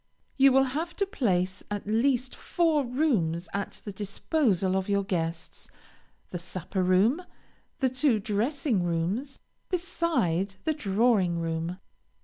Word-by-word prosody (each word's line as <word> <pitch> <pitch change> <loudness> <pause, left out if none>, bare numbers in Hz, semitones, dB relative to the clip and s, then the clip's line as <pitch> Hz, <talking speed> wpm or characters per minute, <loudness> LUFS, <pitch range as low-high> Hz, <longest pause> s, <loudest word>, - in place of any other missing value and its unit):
You 275 0 +6
will 265 +1 +5
have 310 +6 -3
to 400 - +1
place 190 - 0
at 205 -1 -4
least 250 +4 +1
four 325 -4 +1
rooms 235 - 0
at 200 0 -4
the 205 - -4
disposal 200 - 0
of 190 +1 -1
your 200 0 +2
guests 165 -3 -4 0.6
the 175 - -4
supper 185 +2 -4
room, 190 - +3 0.6
and 260 -2 0
two 255 -3 +3
dressing 225 - 0
rooms, 175 - -1 0.3
beside 330 - 0
the 315 - +1
drawing 205 - +2
room. 165 +2 -2
205 Hz, 130 wpm, -28 LUFS, 185-275 Hz, 0.6 s, You